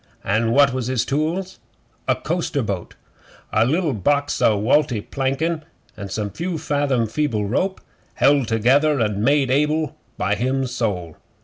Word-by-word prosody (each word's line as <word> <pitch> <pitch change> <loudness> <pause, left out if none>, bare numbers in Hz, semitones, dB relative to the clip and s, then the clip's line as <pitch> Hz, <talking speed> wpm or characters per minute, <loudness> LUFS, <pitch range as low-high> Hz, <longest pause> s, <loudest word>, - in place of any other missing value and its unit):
An' 110 +4 +1
what 140 +2 +4
was 130 -2 -2
his 130 -3 0
tools? 165 +7 -2 0.5
A - - +3
coaster - - -2
boat - - -4 0.6
a 110 +2 +3
liddle 160 +1 +1
box 145 +6 0
o' 110 - +4
walty 125 +1 +2
plankin' 140 +8 -2 0.3
an' 100 -2 -7
some 105 0 -3
few 170 - -3
fathom 145 -5 0
feeble 115 -2 -1
rope 185 - -1 0.4
held 140 -3 +3
together 135 +7 +3
an' 105 -2 0
made 140 0 +3
able 150 +1 +1 0.2
by - - 0
him 130 +2 0
sole. 105 -10 -3
135 Hz, 145 wpm, -21 LUFS, 115-150 Hz, 0.6 s, what